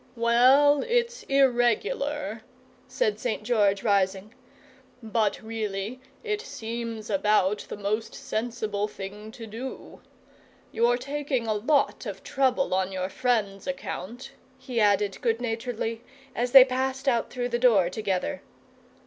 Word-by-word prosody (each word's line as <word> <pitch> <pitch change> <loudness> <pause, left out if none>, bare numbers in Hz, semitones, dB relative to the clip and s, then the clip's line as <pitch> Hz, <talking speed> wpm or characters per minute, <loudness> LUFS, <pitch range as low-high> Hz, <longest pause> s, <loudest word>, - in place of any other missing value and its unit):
"Well, 255 +5 +5
it's 480 0 0
IRREGULAR," 270 - +1 0.5
said 485 -4 0
St. - - -2
George, 205 -4 +2
rising, 200 0 +1 0.7
"but 220 -2 0
really 220 +1 -4 0.2
it 425 -2 -2
seems 230 - -6
about 205 0 +2
the - - -5
most 215 +2 -2
sensible 215 -2 -3
thing 210 +2 -8
to 230 - -9
do. 230 +5 -8 0.7
You're 240 +1 +2
taking 275 -1 -2
a 220 - 0
lot 275 +8 +1
of - - -7
trouble 265 -3 +1
on 190 0 0
your 185 0 -3
friend's 215 -3 -1
account," 265 -3 -5 0.3
he 255 -2 -4
added, 205 -2 +2
good 230 -1 +1
naturedly, 230 -1 -3 0.3
as 245 +1 -1
they 265 -1 +10
passed 265 +1 -2
out 235 -3 +2
through 245 -1 -3
the 240 0 -1
door 220 -8 +5
together. 215 +8 -2
230 Hz, 125 wpm, -26 LUFS, 210-260 Hz, 0.7 s, they